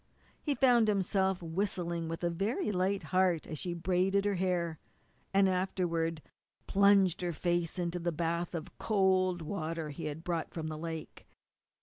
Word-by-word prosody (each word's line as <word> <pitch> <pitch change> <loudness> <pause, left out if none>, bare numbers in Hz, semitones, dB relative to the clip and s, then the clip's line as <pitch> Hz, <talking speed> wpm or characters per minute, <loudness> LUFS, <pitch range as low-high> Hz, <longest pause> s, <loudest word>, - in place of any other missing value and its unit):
He 290 -2 0
found 245 -5 +5
himself 190 -2 +1
whistling 170 -1 -2
with 165 +2 -5
a 170 - +1
very 210 - -1
light 190 +1 0
heart 185 -3 +3
as 155 -3 -6
she 175 -1 -2
braided 190 +3 +1
her 205 - +2
hair, 175 -4 -1 0.5
and 195 0 +4
afterward 175 -4 -1 0.4
plunged 200 -3 +4
her 175 -1 -1
face 175 +1 -1
in 175 -1 -1
a 175 0 -1
bath 170 +2 -2
of 160 - -6
cold 185 -4 +2
water 160 -2 -3
he 145 - -6
had 155 +2 -5
brought 170 -2 -3
from 160 -2 -3
the 155 - -5
lake. 160 -1 -6
175 Hz, 155 wpm, -32 LUFS, 165-190 Hz, 0.5 s, found